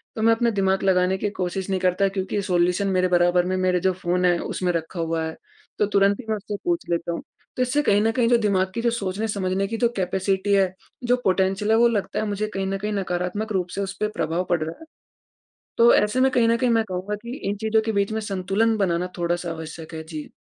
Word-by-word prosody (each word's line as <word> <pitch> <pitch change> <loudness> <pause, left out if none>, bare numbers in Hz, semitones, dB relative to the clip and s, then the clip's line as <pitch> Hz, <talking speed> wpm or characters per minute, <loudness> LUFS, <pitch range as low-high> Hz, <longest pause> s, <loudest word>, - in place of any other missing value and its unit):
तो 220 - -3
मैं 230 0 +6
अपने 235 0 +1
दिमाग 195 -2 +1
लगाने 185 0 +2
की 205 - -1
कोशिश 185 0 -3
नहीं 190 -1 0
करता, 185 +2 +2
क्योंकि 195 +1 -2
सॉल्यूशन 180 +1 +1
मेरे 185 -1 +2
बराबर 175 0 +3
में, 185 +1 -1
मेरे 185 -1 +2
जो 190 +2 +2
फ़ोन 180 0 -1
है 175 -1 +4
उसमें 180 -1 -2
रखा 170 +1 -4
हुआ 165 0 -1
है, 160 - -6 0.4
तो 210 - +4
तुरंत 200 0 +3
ही - - -17
उस 210 - -4
से 210 - -3
मैं - - -2
पूछ 345 - -1
लेता 170 0 -1
हूँ। - - -4 0.4
तो - - 0
इससे 275 +4 +1
कहीं 205 -4 +3
न 225 - +2
कहीं 235 0 +1
जो 240 - +5
दिमाग 190 -4 +1
की 230 - -1
सोचने 210 -1 -2
समझने 195 -1 -1
की 225 +2 -4
जो 235 0 +2
कैपेसिटी 190 +2 0
है 190 -2 +3 0.3
जो 245 +1 +3
पोटेंशियल 195 +3 +1
वो 235 +1 +5
लगता 215 -4 -1
है 215 - -1
मुझे 205 +1 -2
कहीं 195 0 -2
न 195 0 -1
कहीं 210 +2 -3
नकारात्मक 190 +3 -2
रूप 185 -2 0
से 200 - -2
उस 195 0 -3
पे 215 - +1
प्रभाव 165 +3 0
पड़ 175 -2 +1
रहा 160 +1 -6
है। 320 - -12 0.9
तो 235 +1 +7
ऐसे 210 +5 +2
में 265 - +5
कहीं 240 -2 +3
न 230 0 +3
कहीं 250 0 +1
मैं 225 -1 +3
कहूँगा 185 +3 -3
कि 235 +2 -6
इन 205 - -1
चीज़ों 220 0 +2
के 225 - 0
बीच 200 0 0
में 220 - -2
संतुलन 200 +3 0
बनाना 180 -2 0
थोड़ा 175 0 0
सा 175 -1 -5
आवश्यक 160 0 -8
है। 160 - -6
जी। 155 -2 -8
195 Hz, 245 wpm, -23 LUFS, 180-215 Hz, 0.9 s, तो